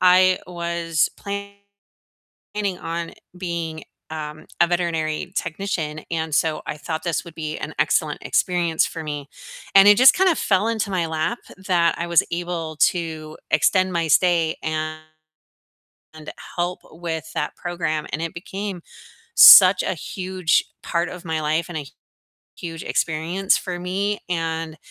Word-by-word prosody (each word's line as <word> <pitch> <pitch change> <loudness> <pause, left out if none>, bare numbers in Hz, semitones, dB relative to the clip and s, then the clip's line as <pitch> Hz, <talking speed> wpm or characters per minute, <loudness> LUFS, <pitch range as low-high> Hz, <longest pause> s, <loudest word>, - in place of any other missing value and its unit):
I 185 0 +5
was 170 -2 -1
planning 200 0 -8 0.9
on 170 0 -4 0.3
being, 170 -3 -4 0.3
um, 155 -1 -7
a 175 - +6
veterinary 170 -1 -1
technician, 160 -3 -3
and, 160 -1 -2
so, 155 +1 +1
I - - -4
thought 160 +1 -5
this 170 -3 -2
would 170 -2 -12
be 155 -1 -5
an - - -6
excellent - - +1
experience 175 -3 +1
for 165 - -6
me. 145 -2 -5 0.5
And 195 +1 +8
it 205 - +8
just 260 +1 +8
kind 380 0 +4
of 330 - 0
fell 200 +2 +2
into 220 -3 -1
my 180 -3 0
lap 160 +8 -2 0.2
that 180 -3 +1
I 170 - -2
was 170 -2 +4
able 170 -2 -4
to 160 -3 0
extend 185 -1 +3
my 170 -2 0
stay 165 0 +3
and 155 0 -3 1.6
help 175 +1 -1
with 160 -1 -5
that - - -3
program, 165 -3 -3
and 155 - -3
it 165 -1 -4
became 190 +1 -6 0.5
such - - +10
a - - -1
huge 185 -4 0 0.2
part 170 0 -1
of 180 0 -10
my 160 -1 -1
life, 155 +2 0
and 175 - -5
a 150 - -5 0.7
huge 165 -2 -7
experience 170 +4 0
for 180 -2 -5
me, 195 +3 -1
and 165 -2 -3
170 Hz, 145 wpm, -22 LUFS, 160-185 Hz, 1.6 s, such